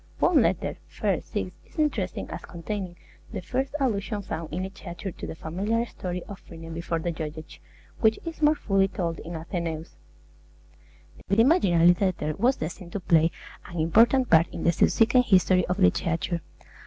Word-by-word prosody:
One - - +4
letter - - 0 0.3
(i. - - +2
6) - - -4
is - - -22
interesting 240 - -1
as - - -5
containing 180 +1 -5 0.4
the 210 - -4
first 260 +9 -2
allusion 210 -5 -1
found 165 -3 -5
in 180 +4 -2
literature 190 0 -6
to - - -8
the - - -6
familiar 200 +9 -1
story 180 -5 -5
of 200 -1 -9
Phryne 165 -1 -10
before 165 0 -2
the 170 +1 -2
judges, 155 -1 -7 0.4
which 220 -1 +4
is 330 -1 -6
more 300 +1 +5
fully 195 -8 +2
told 170 -4 -3
in 170 +1 -7
Athenaeus. 165 -1 -4 1.3
The 200 +3 +4
imaginary 175 - +5
letter 180 -6 0
was 255 +3 +3
destined 170 +2 -6
to 205 - -2
play 165 -3 +4 0.4
an 175 -2 -6
important 230 +10 +4
part 165 +1 +6
in - - -6
the 170 - +4
subsequent 230 +8 +3
history 185 -2 +4
of 180 - -1
literature. 170 -3 +1
185 Hz, 165 wpm, -26 LUFS, 165-220 Hz, 1.3 s, part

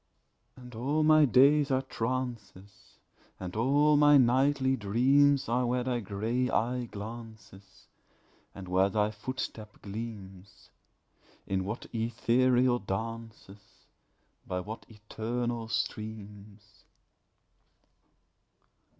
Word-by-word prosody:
And 125 -1 -12
all 140 +7 0
my 155 0 +6
days 140 +3 +4
are 130 0 +1
trances, 115 -6 -6 0.4
And 90 0 -7
all 145 +6 +3
my 145 0 +6
nightly 130 +1 +3
dreams 130 +6 +3
Are 120 +2 0
where 125 +1 0
thy 125 -1 -1
grey 115 +5 -2
eye 125 +2 -1
glances, 105 -3 -11 0.7
And 95 -1 -9
where 95 +2 +2
thy 105 +1 0
footstep 110 -1 -7
gleams 100 -3 -9 0.7
In 95 -1 -2
what 105 +4 -5
ethereal 120 +2 +2
dances, 110 0 -6 0.9
By 90 - -2
what 105 +5 -8
eternal 115 +2 -4
streams. 105 -2 -6
115 Hz, 95 wpm, -29 LUFS, 105-130 Hz, 0.9 s, my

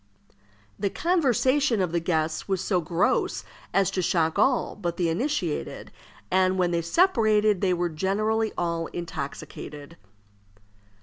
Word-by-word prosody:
The 200 0 0
conversation 275 - +2
of 180 -3 0
the 170 - +1
guests 160 -2 -1
was 190 -2 0
so 180 -3 +1
gross 170 +3 0 0.3
as 195 -2 +2
to 185 - -1
shock 165 +1 +1
all 255 +3 +2
but 175 -4 -4
the 175 -2 +1
initiated, 185 - -2 0.4
and 185 0 +3
when 180 -1 +2
they 170 -1 +1
separated 215 - +3
they 185 -3 +2
were 175 0 0
generally 215 +6 0
all 170 -1 -1
intoxicated. 155 -2 -7
185 Hz, 130 wpm, -26 LUFS, 170-215 Hz, 0.4 s, and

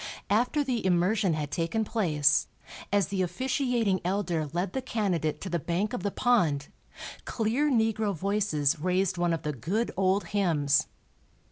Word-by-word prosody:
After 245 +8 +2
the 250 -4 -2
immersion 185 0 +2
had 150 -2 -4
taken 170 +7 -1
place, 150 -10 +2 0.4
as 200 -4 +2
the 195 -2 -1
officiating 235 - 0
"elder" 175 -5 -1
led 175 +4 -2
the 265 - -2
candidate 190 - -1
to 190 - -5
the 170 - 0
bank 175 - -2
of 245 - -3
the 205 - -1
pond, 170 -12 +1 0.6
clear 240 +6 0
negro 220 -4 +1
voices 170 -5 0
raised 185 +2 0
one 175 -1 +2
of 165 - -2
the 150 - -2
good 185 - -2
old 190 +1 +2
hymns. 155 -8 +2
190 Hz, 150 wpm, -28 LUFS, 165-220 Hz, 0.6 s, After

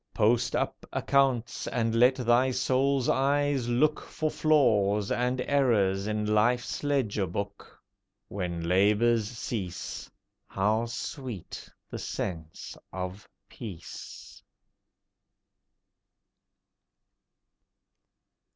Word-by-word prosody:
Post 115 +2 +2
up - - -2
accounts, 130 -4 +1
and 115 -2 0
let 125 +3 +5
thy 125 0 +3
Soul's 130 +1 +1
eyes 140 -1 +1
look 150 +5 +2
For 155 -1 -3
flaws 105 -10 +2
and 125 +1 0
errors 105 -9 +2
in 105 0 -1
Life's 110 +6 +1
ledger 125 -9 0
book. 100 +4 -6 0.5
When 90 -4 -4
labours 105 +4 +3
cease, 105 -6 -5 0.4
How 110 +4 0
sweet 120 - -6 0.2
the - - -5
sense 80 -5 -5 0.2
of 95 +2 -6 0.2
peace! 95 -8 -10
115 Hz, 85 wpm, -28 LUFS, 100-130 Hz, 0.5 s, let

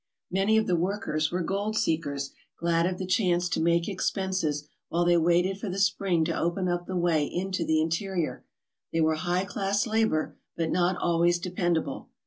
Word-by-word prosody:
Many 195 +4 +3
of 220 - +3
the 180 - +2
workers 170 -4 -1
were 180 0 -1
gold 200 +4 -2
seekers 145 -8 -1 0.3
glad 170 0 +2
of 180 0 -2
the 185 - -3
chance 180 -2 +2
to - - 0
make 170 +1 +2
expenses 175 -7 -1 0.2
while 175 +1 +1
they 175 0 +4
waited 175 +3 +2
for 205 - -4
the 185 - -4
spring 195 -4 +2
to 165 - -1
open 175 +2 0
up 175 0 -1
the 185 - -2
way 170 -4 +2
into 185 +2 -2
the 160 -1 +2
interior. 165 +1 -1 0.5
They 165 - +1
were 160 0 +3
high 175 +4 0
class 200 0 0
labour 220 -8 0 0.2
but 165 -1 -1
not 180 0 +2
always 170 0 +2
dependable. 175 -5 -2
175 Hz, 180 wpm, -27 LUFS, 165-190 Hz, 0.5 s, they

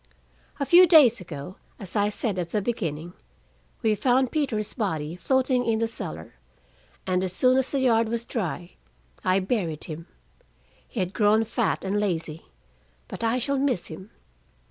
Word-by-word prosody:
A 280 - 0
few 355 +5 +7
days 275 - +6
ago, 160 +1 -8 0.2
as 195 -1 -6
I 205 0 +2
said 205 -2 -2
at 170 -1 -3
the 210 - 0
beginning, 175 -7 -3 0.7
we 220 -1 +3
found 250 +4 +2
Peter's 235 -9 -1
body 165 - -2
floating 255 +6 +1
in 225 -2 +1
the 225 0 0
cellar, 80 - -6 0.7
and 185 0 0
as 185 -1 -2
soon 255 +6 +3
as 265 0 +1
the 275 - -1
yard 230 -3 +3
was 235 0 -3
dry, 175 -7 -4 0.5
I 185 +1 +3
buried 185 -7 -2
him. 165 +2 -7 0.8
He 225 - -4
had 185 +1 -3
grown 215 +1 +3
fat 225 -3 -1
and 200 +2 0
lazy, 165 -6 -3 0.6
but - - -7
I 230 +2 +2
shall 275 +2 -1
miss 265 -9 0
him. 190 +6 -11
210 Hz, 165 wpm, -25 LUFS, 180-245 Hz, 0.8 s, few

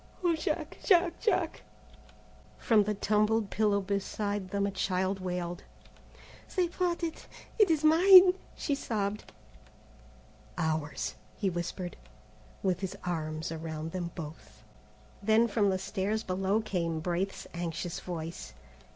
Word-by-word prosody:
"O 345 -2 +3
Jack! 315 - -3
Jack! 350 -3 +4
Jack!" 365 -7 0 1.0
From 215 -3 +3
the 210 0 -1
tumbled 215 +1 +1
pillow 205 -2 +2
beside 200 0 -2
them 200 +1 0
a 200 - -1
child 190 0 -1
wailed. 180 -1 -4 0.9
"They 360 -2 +2
brought 350 -1 -1
it; 325 -1 -4 0.3
it 420 -4 +6
is 315 -2 +2
mine," 365 +4 +9 0.2
she 290 - -1
sobbed. 210 -6 -3 1.3
"Ours," 155 -3 -1 0.2
he 195 -3 0
whispered, 175 +1 -4 0.7
with 185 -2 +1
his 190 -2 -4
arms 160 -2 -3
around 160 0 -5
them 175 -1 -3
both. 150 -9 -9 0.6
Then 220 +3 +4
from 205 -2 +2
the 190 - +1
stairs 205 +3 -2
below 195 +3 0
came 170 -6 -2
Braith's 180 +4 -2
anxious 170 0 -3
voice. 165 - -6
195 Hz, 125 wpm, -30 LUFS, 175-225 Hz, 1.3 s, mine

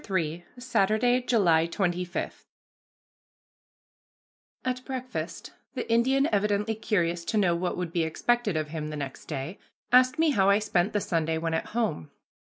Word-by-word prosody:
III 170 -2 -1
SATURDAY, 245 +1 +2
JULY 170 -9 +4
25 180 0 -2 2.2
At 255 0 -2
breakfast, 255 -1 -5 0.2
the - - -3
Indian, 265 +5 +3
evidently 210 +1 +1
curious 175 -6 0
to 220 - -1
know 180 -5 +3
what 175 +1 -2
would 180 -2 -3
be 170 - +1
expected 205 +4 0
of 155 -1 -2
him 155 -1 -4
the 155 0 -5
next 140 -2 -6
day, 150 +5 -5 0.3
asked 255 +1 +5
me 320 -1 +3
how 195 -6 +3
I 200 - +6
spent 205 -2 0
the 205 - +1
Sunday 160 -3 0
when 165 0 -2
at 160 - -1
home. 205 - -1
195 Hz, 150 wpm, -27 LUFS, 165-235 Hz, 2.2 s, I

